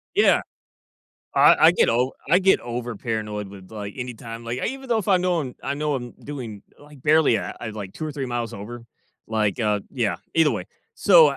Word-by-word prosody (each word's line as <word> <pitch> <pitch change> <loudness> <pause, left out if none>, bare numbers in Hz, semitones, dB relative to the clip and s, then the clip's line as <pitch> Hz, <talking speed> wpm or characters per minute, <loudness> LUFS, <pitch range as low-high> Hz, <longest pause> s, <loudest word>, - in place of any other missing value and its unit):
Yeah, - - +5 0.9
I - - +7
I - - +8
get - - +3
o 125 +3 +2 0.2
I 180 - +7
get 190 0 +4
over 120 0 -4
paranoid 105 -3 -3
with 95 -1 -12
like 105 -2 -6
anytime 115 -2 -6
like, 120 +2 -3
even 265 +1 -4
though 230 -2 +3
if 205 - -3
I 190 - +6
know 180 -2 +1
I'm 130 -4 -5
I 140 - -2
know 150 0 -1
I'm 120 -2 -4
doing, 120 -8 -8 0.2
like, 145 -2 -16
barely, 155 -5 +4
uh, - - -4
I 115 - -4
like, 100 -3 -7
2 155 - -5
or 150 - -4
3 135 -2 -3
miles 120 -2 -3
over, 115 +4 -8 0.4
like, 110 -2 0
uh, 105 -2 +1
yeah, 120 -7 0 0.2
either 160 -3 +5
way, 100 -6 -3 0.3
so, 170 -6 +7
uh 140 - -2
120 Hz, 210 wpm, -24 LUFS, 110-150 Hz, 0.9 s, I